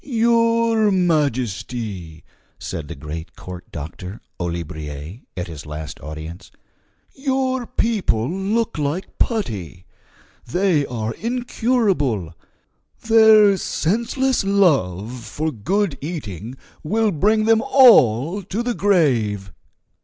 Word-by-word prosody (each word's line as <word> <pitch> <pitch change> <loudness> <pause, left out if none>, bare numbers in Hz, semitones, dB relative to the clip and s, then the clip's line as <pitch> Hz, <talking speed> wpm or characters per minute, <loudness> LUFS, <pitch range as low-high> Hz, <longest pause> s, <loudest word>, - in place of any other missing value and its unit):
"Your 230 -2 +2
Majesty," 120 - -1 0.3
said 75 -3 -6
the - - -7
great 75 +4 -8
court 90 -1 -10
doctor, 90 +6 -7 0.2
Olibriers, 80 0 -5 0.2
at 90 - -2
his 80 -5 -9
last 75 0 -7
audience, 80 +4 -8 0.6
"your 260 -2 -1
people 190 - 0
look 195 +3 -1
like 150 +6 -3
putty! 100 - -2 0.6
They 170 0 +1
are 115 -2 -3
incurable; 220 - 0 0.7
their 220 -2 +7
senseless 235 - 0
love 125 - +1
for 155 +5 -3
good 170 - -1
eating 130 - -6 0.2
will 215 +6 +1
bring 215 +6 +2
them 225 0 +4
all 180 - +5
to 200 +5 -3
the 245 0 -1
grave." 120 - +1
150 Hz, 100 wpm, -21 LUFS, -, 0.7 s, their